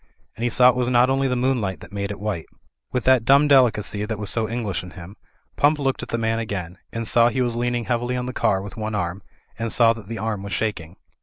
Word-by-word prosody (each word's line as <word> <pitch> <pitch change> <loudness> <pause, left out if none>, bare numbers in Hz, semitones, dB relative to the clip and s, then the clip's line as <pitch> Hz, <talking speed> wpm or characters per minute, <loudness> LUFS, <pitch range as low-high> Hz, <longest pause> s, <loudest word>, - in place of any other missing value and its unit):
And 115 - -6
he 120 - +2
saw 125 +1 +6
it 125 - +1
was 125 -1 0
not 125 +1 +4
only 135 0 +1
the 125 - 0
moonlight 120 -7 0
that - - -12
made 100 -1 -3
it 100 - -6
white. 100 -6 -4 0.4
With 125 -2 -1
that 130 -2 +4
dumb 140 +4 +5
delicacy 115 -6 +3
that 110 0 -3
was 105 -1 -1
so 110 -2 0
English 115 -5 -2
in 90 - -10
him. 90 +3 -10 0.4
Pump 150 +2 +3
looked 135 -2 -1
at - - -7
the 115 - -1
man 115 0 0
again, 95 -6 -5
and 115 -1 -4
saw 120 0 +5
he 130 +2 -1
was 120 -1 -1
leaning 120 0 -1
heavily 120 +1 -1
on 125 - -3
the 125 - -5
car 100 -6 +1
with 100 -1 -9
one 110 -1 -4
arm, 90 -1 -3 0.4
and 115 -1 -2
saw 115 -1 +4
that 115 -4 -12
the 115 +1 -5
arm 110 -1 -3
was 100 -1 -6
shaking. 85 -4 -3
115 Hz, 255 wpm, -22 LUFS, 100-125 Hz, 0.4 s, saw